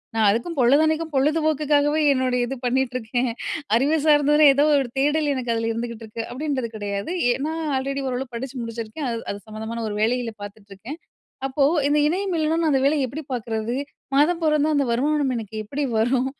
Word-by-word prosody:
"நான் 220 -2 +3
அதுக்கும் 240 +10 -1
பொழுதன்னைக்கும் 310 +5 +3
பொழுது 300 +4 +2
போக்குக்காகவே 295 0 +2
என்னுடைய 255 -1 0
இது 270 - -4
பண்ணிட்டுருக்கேன். 250 -1 -1 0.4
அறிவு 290 +5 +2
சார்ந்ததுன்னா 295 0 +5
ஏதோ 285 - +4
ஒரு 270 - 0
தேடல் 295 +1 +2
எனக்கு 245 -3 -1
அதுல 225 0 -1
இருந்துகிட்டுருக்கு" 230 -1 -5
அப்பிடீன்றது 265 -3 -3
கிடையாது. 200 +7 -4 0.2
ஏன்னா 295 +5 -3 0.2
ஆல்ரெடி 275 +1 -3
ஓரளவு 250 0 -4
படிச்சு 265 +3 -6
முடிச்சுருக்கேன். 230 +5 -5
அது, 230 - -3
அது 200 - -5
சம்மந்தமான 220 +2 -5
ஒரு 205 - -4
வேலையில 240 +1 0
பார்த்துட்ருக்கேன். 205 - -10 0.5
அப்போ, 270 +1 +1 0.2
இந்த 295 +1 +3
இணையம் 375 +5 -1
இல்லன்னா 315 0 +1
நான் 320 -2 +2
அந்த 270 -2 +2
வேலைய 285 -1 +2
எப்பிடி 280 +6 -6
பார்க்கிறது? 225 -1 -2 0.4
மாதம் 320 +5 +3
பொறந்தா 305 -1 +2
அந்த 285 -1 +2
வருமானம் 280 +3 +1
எனக்கு 220 -2 -6
எப்பிடி 280 +7 -3
வரும்? 245 +3 +2
265 Hz, 165 wpm, -23 LUFS, 230-295 Hz, 0.5 s, சார்ந்ததுன்னா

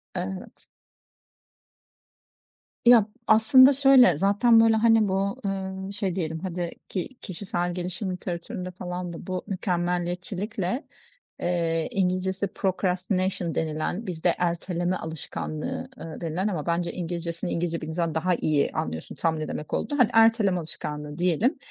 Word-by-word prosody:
Evet. 185 +1 -6 2.2
Ya, 235 -3 +7 0.2
aslında 260 +5 +7
şöyle, 260 - +6
zaten, 205 +5 +4
böyle, 225 0 +5
hani, 225 -1 +4
bu, 195 +1 -1
ııı, 190 0 -3
şey 190 -3 -2
diyelim 160 -3 -2
hadi, 175 -1 -3 0.2
ki 185 +2 -3
kişisel 175 -2 -3
gelişim 185 +2 -4
literatüründe 180 0 -5
falan 180 -1 -5
da 165 - -9
bu 185 -1 -3
mükemmeliyetçilikle, 180 - -2 0.5
eee, 165 -2 0
İngilizcesi 190 +1 0
procrastination 185 -1 -1
denilen, 160 +6 -2
bizde 170 0 0
erteleme 175 +1 -1
alışkanlığı, 160 - -5
ııı, 165 0 -8
denilen 170 +4 -1
ama 175 -8 -2
bence 170 0 0
İngilizcesini 170 0 -4
İngilizce 170 0 -1
bildiğin 160 - -6
zaman 165 -2 -1
daha 180 +2 +1
iyi 150 -3 +1
anlıyorsun 80 0 -4
tam 160 -1 0
ne 155 - -3
demek 150 - -6
olduğunu. 290 -2 -1
Hani, 240 -2 +5
erteleme 225 -5 +4
alışkanlığı 150 -2 -6
diyelim. 180 - +2
180 Hz, 125 wpm, -26 LUFS, 170-200 Hz, 2.2 s, Ya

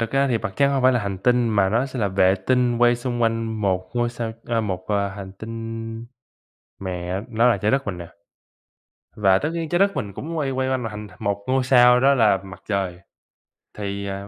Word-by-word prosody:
thực 115 -1 -1
ra 135 0 +2
thì 120 -3 +1
Mặt 110 -3 -4
Trăng 140 0 +3
hông 135 -2 0
phải 130 0 +5
là 120 - +1
hành 100 -2 -4
tinh 120 +2 +2
mà 100 -3 +2
nó 115 +6 +1
sẽ 130 -1 -7
là 105 - +1
vệ 95 -1 +3
tinh 125 -2 +2
quay 120 0 +4
xung 120 -1 -3
quanh 115 -1 -1
một 95 -2 0
ngôi 120 0 +1
sao, 115 -2 -4
ơ, 115 -1 +1
một, 95 -4 -3
à, 100 -1 +1
hành 95 -1 -8
tinh 115 +2 -7 0.7
mẹ, 90 0 -3
nó 115 +1 +3
là 115 - +3
Trái 105 +3 0
Đất 135 -2 0
mình 90 -3 -3
nè. 85 - -7 1.1
Và 95 -3 +4
tất 150 - -2
nhiên 165 -2 -3
Trái 175 - +1
Đất 195 +1 +2
mình 100 -1 -3
cũng 165 - -6
quay 140 -3 -1
quay 130 0 -1
quanh 130 -1 -1
mà 115 - -4
hành 105 0 -7
một 100 0 -2
ngôi 130 0 +2
sao 125 -1 +6
đó 140 +2 +5
là 110 -6 +4
Mặt 95 -1 -11
Trời, 95 -4 -2 0.8
thì, 100 -1 -4
à, 100 0 -5
115 Hz, 230 wpm, -23 LUFS, 100-125 Hz, 1.1 s, sao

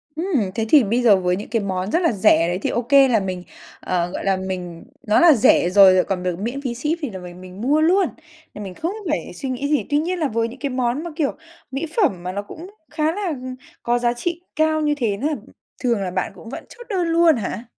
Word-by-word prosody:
Ừm, 305 - -1
thế 225 -1 -1
thì 290 0 +7
bây 230 +4 0
giờ 225 -5 +6
với 180 -1 0
những 205 - -7
cái 230 -1 0
món 190 0 -3
rất 340 - +2
là 335 - +3
rẻ 185 -6 +3
đấy 175 +1 -2
thì - - -1
OK 240 +2 -3 0.2
là 230 -3 +3
mình, 185 -2 -4 0.4
ờ, 175 -1 -1
gọi - - -5
là, 195 -1 +2
mình 180 -3 -6 0.2
nó 210 - +4
là 340 -2 +7
rẻ 210 -7 +4
rồi 190 0 +7
lại 185 -1 +4
còn 185 -2 -3
được 180 -1 -2
miễn 240 +7 -4
phí 255 -4 -3
ship 300 +7 -2
thì 290 - -3
là 190 -3 -7
mình 180 0 -10
mình 185 +2 -10
mua 290 +6 +2
luôn, 365 +4 +4 0.5
là 210 - -8
mình 190 -2 -7
không 330 - -3 0.2
phải 300 - -3
suy 270 - -5
nghĩ 260 +2 -2
gì. 295 -2 +1
Tuy 290 - +2
nhiên 350 +4 -1
là 310 - +1
với 230 -2 -1
những 245 +3 -11
cái 280 - -2
món 255 +3 -1
mà 345 - -6
kiểu 300 -4 0 0.4
mỹ 270 +5 -3
phẩm 270 - +1
mà 180 - -3
nó 200 - -3
cũng 320 - -11 0.2
khá 310 0 0
là, 400 +3 -3
ừm, 255 -4 -5 0.3
có 240 +1 +1
giá 240 0 +1
trị 340 +8 -4
cao 315 0 +2
như 295 -1 +1
thế 220 -7 -1
nữa, 275 - -1 0.6
thường 235 -5 +1
là 185 -2 -3
bạn 185 +1 -2
cũng 225 - -12
vẫn - - -7
chốt 485 - -12
đơn 365 -5 0
luôn 330 -1 +4
hả? 215 -1 -4
240 Hz, 260 wpm, -21 LUFS, 190-305 Hz, 0.6 s, thì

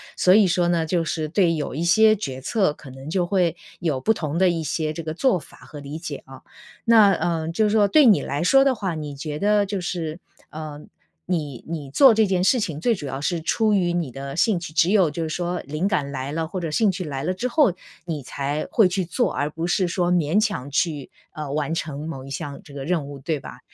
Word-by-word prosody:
所 185 +2 +5
以 215 -2 +6
说 175 0 +2
呢， 170 -2 +1
就 170 0 0
是 155 -1 -2
对 170 +1 +2
有 150 -4 -3
一 160 - -2
些 215 +5 +5
决 135 -10 -5
策， 190 - +1
可 135 -3 -13
能 135 +3 -10
就 180 +1 0
会 175 -3 +1 0.2
有 155 -6 -1
不 220 - +2
同 155 -5 -3
的 185 0 +4
一 165 -2 -1
些 155 +1 -2
这 165 - -5
个 155 -1 -4
做 250 -5 +2
法 - - -15
和 145 - -11
理 145 +2 -7
解 160 -4 -5
啊。 135 0 -12 0.4
那， 220 -3 +6
呃， 165 -2 -1
就 215 +5 +1
是 210 - +1
说 210 -2 +4
对 300 +7 +5
你 215 -5 +6
来 145 +4 -2
说 270 +9 +5
的 270 -1 +2
话， 195 -6 -3
你 150 -2 -6
觉 150 +1 -5
得 205 0 +3
就 195 -2 -3
是， 170 -2 -4 0.3
呃， 155 -1 -7 0.5
你 150 -8 -3
你 155 -4 -5
做 260 - +6
这 220 0 +3
件 185 -2 0
事 250 - +4
情 160 -7 -3
最 230 +5 +2
主 150 - -7
要 135 0 -4
是 165 +4 -1
出 215 +6 +1
于 180 -3 +2
你 170 -6 -2
的 135 +2 -7
兴 215 -3 +3
趣 170 -2 -7
只 170 +3 +3
有 190 -7 +4
就 165 +2 -3
是 160 - -3
说 175 +2 -2
灵 155 +6 -3
感 145 -9 0
来 140 0 -4
了， 160 +1 -2
或 185 +3 -5
者 165 -3 -3
兴 215 +5 +3
趣 185 -1 -3
来 140 -4 -4
了 180 - 0
之 195 +7 -2
后， 270 - +3 0.3
你 155 -6 -4
才 140 +4 -3
会 215 -5 +5
去 185 +1 -1
做， 170 -1 -1
而 145 +1 -1
不 165 +2 -4
是 180 0 +1
说 175 0 0
勉 170 +2 +2
强 185 - -2
去， 145 -2 -1 0.2
呃， 150 -2 -6
完 150 +2 -1
成 155 -1 -4
某 135 -5 -6
一 135 - -10
项 140 0 -6
这 140 - -14
个 135 -1 -6
任 165 -4 0
务， 145 -1 -9
对 150 +2 -2
吧？ - - -10
165 Hz, 265 characters per minute, -23 LUFS, 150-190 Hz, 0.5 s, 以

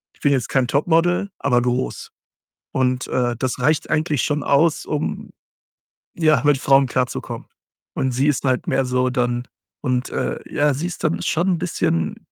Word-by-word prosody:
Ich - - -29
bin 145 - +3
jetzt 130 -4 0
kein 130 -2 +2
Topmodel, 165 +7 +2
aber 125 -3 +2
groß 125 +1 -2 0.6
und, 130 -1 0
äh, 120 -2 0
das 130 0 -2
reicht 150 0 +1
eigentlich 155 -3 +1
schon 145 0 -1
aus, 155 +3 +2
um 150 0 -3 0.8
ja, 155 -6 +3
mit 145 -1 +4
Frauen 135 0 +4
klarzukommen 125 0 -3 0.5
und 130 - 0
sie 130 +4 +1
ist 150 - +1
halt 130 -2 0
mehr 135 - +1
so 125 0 +1
dann 120 -1 -1 0.3
und, 125 -2 -1
äh, - - -2
ja, 145 0 +2
sie 150 +6 -3
ist 180 - -7
dann 155 0 0
schon 170 +3 0
'n - - -4
bisschen 120 - -1
135 Hz, 170 wpm, -21 LUFS, 125-155 Hz, 0.8 s, mit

